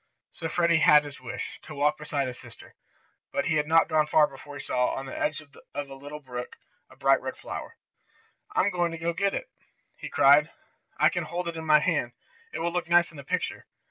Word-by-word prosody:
So 165 - -5
Freddie 170 -1 +3
had 150 -1 +7
his 145 -2 -10
wish, 120 -2 -6
to 155 - -10
walk 150 +2 +1
beside 145 -2 -2
his 125 -1 -6
sister. - - -14 0.6
But - - -1
he 160 - +1
had 150 0 0
not 165 +1 +5
gone 155 -1 +2
far 155 0 +5
before 145 0 -11
he 140 - -7
saw, 125 -4 0
on 135 - -5
the 135 - -7
edge 155 0 -1
of 145 -2 -20 0.2
a 140 -1 -4
little 145 +2 -9
brook, 125 -3 -7 0.3
a - - -17
bright - - +3
red - - -5
flower. - - -7 0.8
"I'm 200 - +3
going 175 -1 0
to 170 +1 -1
get 200 +3 0
it!" - - -3 0.5
he - - -8
cried. 145 +3 +5 0.5
"I - - +5
can - - -3
hold 175 0 -4
it 170 - -6
in 160 0 -6
my 150 -1 +6
hand. 150 -8 0 0.4
It - - -5
will 170 +1 0
look 175 -1 -2
nice 175 +1 +4
in 160 - -14
the 140 - -8
picture." - - -3
150 Hz, 220 wpm, -27 LUFS, 140-170 Hz, 0.8 s, had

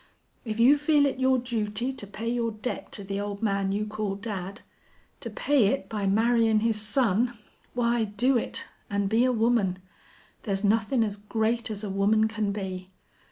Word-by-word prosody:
If 220 -1 -4
you 265 +5 +6
feel 295 -1 +4
it 270 -2 -1
your 260 0 +3
duty 235 0 -2
to 205 -6 -6
pay 215 +3 -6
your 235 -1 0
debt 215 +4 -5
to 205 - -3
the 195 +1 -3
old 205 +1 -5
man 195 -2 +1
you 210 +2 -1
call 210 -2 -3
dad 200 -1 -5 0.6
to - - -6
pay 290 - +2
it 275 +7 -1
by 210 -3 -2
marryin' 225 +1 +3
his 220 -1 +1
son, 235 +1 +1 0.4
why 235 -1 +2
do 240 +6 +1
it, 235 - -2 0.2
an' 200 -1 0
be 225 +5 +3
a 255 - +3
woman. 225 -5 +2 0.6
There's 195 -2 -2
nothin' 225 +4 +2
as 205 -2 -3
great 220 +3 -1
as 215 -1 -5
a 205 - -3
woman 210 +3 +3
can 215 -2 -2
be. 190 -2 -5
220 Hz, 180 wpm, -27 LUFS, 200-240 Hz, 0.6 s, you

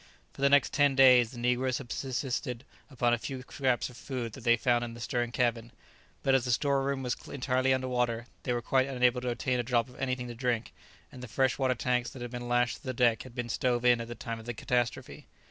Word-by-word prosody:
For - - -11
the 140 - +5
next 140 -1 +4
ten 145 -1 +3
days 125 -3 +7
the 125 - -11
negroes 125 +1 +1
had 125 -4 -9
subsisted 130 -1 -3 0.3
upon 120 -3 +1
a 120 - +1
few 130 +1 -6
scraps 130 -1 0
of 125 - -13
food 125 -3 -5
that 130 - -10
they 120 0 +4
found 120 +1 +2
in 115 -1 -6
the - - -10
stern 120 0 -2
cabin; 120 -1 0 0.5
but 135 - +3
as 135 -2 +4
the 125 - -4
store 140 +3 +2
room 135 0 -2
was 125 -1 -1 0.2
entirely 130 -1 +1
under 130 0 +1
water, 120 -2 -1 0.2
they 125 - -2
were 120 -1 -1
quite 130 0 +2
unable 125 -2 +2
to 125 - -2
obtain 125 +1 -1
a - - 0
drop 120 -1 +1
of 125 - -15
anything 130 -2 -2
to 120 - -6
drink, 120 -1 -2 0.4
and 125 - -11
the 125 - -7
freshwater 130 +2 +1
tanks 125 0 0
that 125 - -9
had 120 - -6
been 120 -1 -5
lashed 120 0 +2
to - - -23
the 130 -3 -4
deck 120 -2 +3
had 130 -2 -12
been 120 -2 -3
stove 120 +1 0
in 120 -1 +5
at 115 - -6
the 120 - -7
time 115 -1 -5
of 110 - -12
the 120 - -4
catastrophe. 120 +1 -2
125 Hz, 250 wpm, -30 LUFS, 120-130 Hz, 0.5 s, days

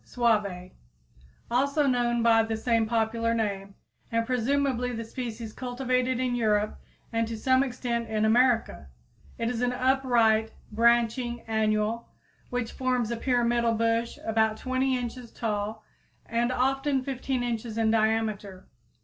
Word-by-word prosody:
suave_, 210 -7 0 0.8
also 280 +4 +2
known 240 -3 +1
by 225 -1 +5
the 225 0 -2
same 230 -1 +1
popular 230 0 0
name, 200 -3 -3 0.4
and 230 0 +1
presumably 250 +1 0
the 230 -1 -4
species 230 -2 -6
cultivated 255 0 -1
in 255 -1 0
Europe 215 -3 +1 0.3
and 230 0 +1
to 225 0 -5
some 260 +3 +3
extent 240 -3 -2
in 215 0 +1
America. 230 - +2 0.5
It 230 - -2
is 240 -1 -3
an 245 0 +1
upright, 245 -4 +2 0.2
branching 235 +1 +2
annual, 220 +1 -1 0.4
which 245 -2 -2
forms 250 -3 -1
a - - 0
pyramidal 235 -1 +1
bush 230 +1 0
about 220 -1 +1
20 260 +1 0
inches 245 -1 -6
tall 215 -1 -3 0.4
and 235 +2 0
often 270 +2 +1
15 260 -1 -2
inches 230 -2 -3
in 220 -1 +2
diameter. 215 -3 0
235 Hz, 130 wpm, -27 LUFS, 220-250 Hz, 0.8 s, by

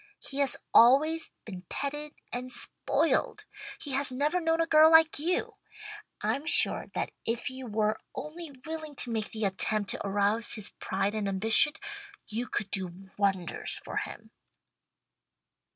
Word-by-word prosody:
He 275 - -5
has 275 -3 +1 0.2
always 305 +7 +5 0.2
been 185 -4 -7
petted 295 +2 -4 0.2
and 250 +1 -4
spoiled. - - 0 0.3
He 290 - -6
has 270 0 +1
never 295 +7 0
known 325 0 +1
a 330 - +3
girl 315 -1 +7
like 320 -2 +6
you. 345 +4 0 0.7
I'm 290 +3 -1
sure - - +5
that - - -2
if 235 +2 -2
you 260 -1 -8
were 215 0 0 0.2
only 320 +2 -6 0.2
willing 315 -2 -6
to 245 - -3
make 220 -2 -2
the 220 -1 -3
attempt 200 +1 +1
to - - -4
arouse 205 +3 0
his 210 -3 -2
pride 195 +2 -1
and 215 -2 -2
ambition, 220 +9 +4 0.5
you 230 +3 -3
could 205 -4 -3
do 190 0 -5
wonders 195 -4 -1
for - - -6
him." - - -6
245 Hz, 150 wpm, -29 LUFS, 205-300 Hz, 0.7 s, girl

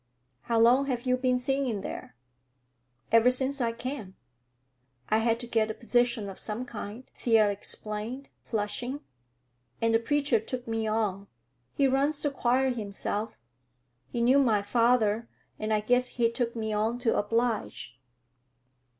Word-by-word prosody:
"How 230 - 0
long 250 +4 +5
have 245 -3 -2
you 255 0 +3
been 255 0 +1
singing 255 -4 -1
there?" - - -7 1.0
"Ever 230 +2 +6
since 265 +2 +3
I 230 -1 +1
came. 230 -5 -6 0.9
I 215 - +3
had 230 0 +1
to - - -5
get 225 -2 +1
a 220 - -4
position 240 -2 0
of 195 - -8
some 215 +4 -3
kind," 225 0 -7
Thea 225 -3 +3
explained, 215 +6 -2
flushing, 240 +6 -3 0.8
"and 230 0 +1
the 225 - +4
preacher 285 -1 +1
took 245 +3 -6
me 225 -1 -1
on. 205 -3 -1 0.5
He 275 - +3
runs 280 +3 +1
the 290 - +1
choir 260 0 +1
himself. 210 -1 -4 0.7
He 235 - -3
knew 255 +4 +5
my 220 -7 +2
father, 230 0 +2 0.3
and 215 0 -2
I 215 -1 +2
guess 245 +3 +2
he 235 -2 +1
took 235 -1 -2
me 220 -1 -3
to 225 +3 0
oblige." 215 - -1
235 Hz, 145 wpm, -28 LUFS, 215-255 Hz, 1.0 s, Ever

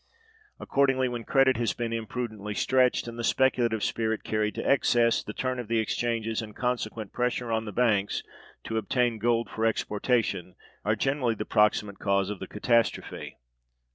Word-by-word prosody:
Accordingly, 135 -2 +2
when 120 -2 -5
credit 135 -2 +4
has 115 -2 0
been 115 -1 -3
imprudently 110 -2 -4
stretched, 130 0 +2
and 120 0 -7
the - - -3
speculative 120 -3 +2
spirit 110 -1 -1
carried 105 0 -1
to - - -3
excess, 120 -3 +3
the - - -7
turn 130 +3 -2
of 120 - -5
the 115 +1 +1
exchanges 115 0 -1
and 105 -2 -9
consequent 115 -4 -3
pressure 125 -1 -1
on 110 0 0
the 105 - -5
banks 105 -3 +1 0.4
to 110 - -3
obtain 120 0 0
gold 115 +1 +1
for 110 - -4
exportation 105 -4 0 0.3
are 105 +1 +2
generally 130 0 0
the 105 - -4
proximate 105 -1 +2
cause 100 -1 +1
of 100 - -6
the - - -6
catastrophe. 115 +2 0
115 Hz, 165 wpm, -27 LUFS, 105-125 Hz, 0.4 s, credit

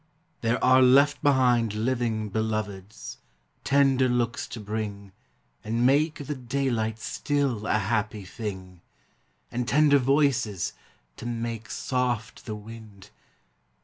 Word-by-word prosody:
there 115 +1 0
are 130 +1 +6
left 140 +3 +5
behind 125 -6 +3
Living 115 -1 -1
Beloveds, 105 - -4 0.4
tender 135 -2 +3
looks 120 0 -1
to 115 - -7
bring, 105 -2 -5 0.5
And 115 +3 0
make 145 +2 +2
the 150 - -3
daylight 120 -4 -1
still 130 -2 -1
a - - +2
happy 105 -1 -1
thing, 95 -3 -7 0.7
And 120 0 -2
tender 145 0 +5
voices, 130 - +1 0.4
to 120 - -6
make 115 -2 -4
soft 125 -4 -2
the 110 - -3
wind. 105 -2 -12
115 Hz, 115 wpm, -26 LUFS, 105-130 Hz, 0.7 s, are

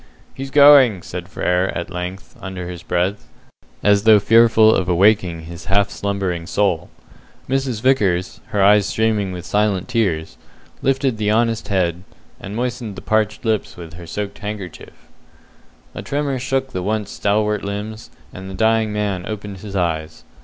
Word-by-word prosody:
"He's 135 0 -6
going!" 140 - +6
said 90 -1 -7
Frere 90 0 0
at 85 - -5
length, 90 +2 -6
under 95 -2 -6
his 90 -1 -7
breath, 90 +4 -2 0.6
as 100 -1 +4
though 110 0 +7
fearful 115 +1 +5
of 90 -1 0
awaking 90 -2 +3
his 85 +1 -10
half 100 +3 +1
slumbering 95 -5 -3
soul. 90 -4 0 0.6
Mrs. 130 -4 -1
Vickers, 100 -9 +1
her 100 -2 0
eyes 100 0 +5
streaming 105 -3 0
with 90 -1 -7
silent 105 -3 0
tears, 100 -11 -1 0.4
lifted 135 -2 +1
the 105 -1 0
honest 115 0 +1
head, 90 -3 0 0.4
and 100 +2 -7
moistened 120 -3 -3
the 95 - -8
parched 110 +1 0
lips 110 -3 -1
with 85 -2 -10
her 85 0 -10
soaked 100 +2 -5
handkerchief. 100 -4 -8 0.9
A - - -6
tremor 140 -2 -2
shook 135 +1 -2
the 95 - -3
once 105 +1 -2
stalwart 105 0 0
limbs, 105 +2 -6 0.2
and 95 +1 -8
the 95 - -7
dying 110 +1 +2
man 100 -4 -2
opened 105 -2 -6
his 100 +1 -8
eyes. 80 -3 -2
100 Hz, 155 wpm, -20 LUFS, 90-110 Hz, 0.9 s, though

